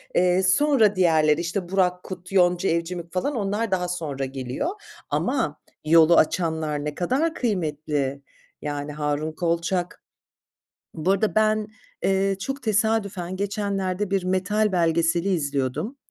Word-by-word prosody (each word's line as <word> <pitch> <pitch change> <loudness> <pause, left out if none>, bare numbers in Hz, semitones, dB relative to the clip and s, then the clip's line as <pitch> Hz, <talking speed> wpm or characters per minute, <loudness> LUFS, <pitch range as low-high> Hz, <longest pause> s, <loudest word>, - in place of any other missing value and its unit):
Eee, 180 +1 +3
sonra 215 +2 +4
diğerleri, 160 -4 +3
işte, 175 +1 -3
Burak 180 -1 +1
Kut, 185 0 -9
Yonca 180 -1 +3
Evcimik 170 0 -3
falan 225 +11 -1
onlar 210 0 -1
daha 180 -1 0
sonra 155 -6 -3
geliyor. 130 - -3 0.4
Ama 245 - -1 0.3
yolu 165 +1 +6
açanlar 160 -3 +1
ne 150 -1 -3
kadar 275 - 0
kıymetli. 150 - -2 0.4
Yani 145 0 -4
Harun 150 +1 -2
Kolçak 170 +2 -2 0.9
Bu 165 +3 -1
arada 200 +2 +1
ben, 215 0 +2 0.4
eee, 195 0 +1
çok 270 +6 -4
tesadüfen 210 -5 0
geçenlerde 200 -1 -2
bir 195 -2 0
metal 195 +3 +1
belgeseli 170 +1 +2
izliyordum, 145 - -1
180 Hz, 125 wpm, -24 LUFS, 160-200 Hz, 0.9 s, yolu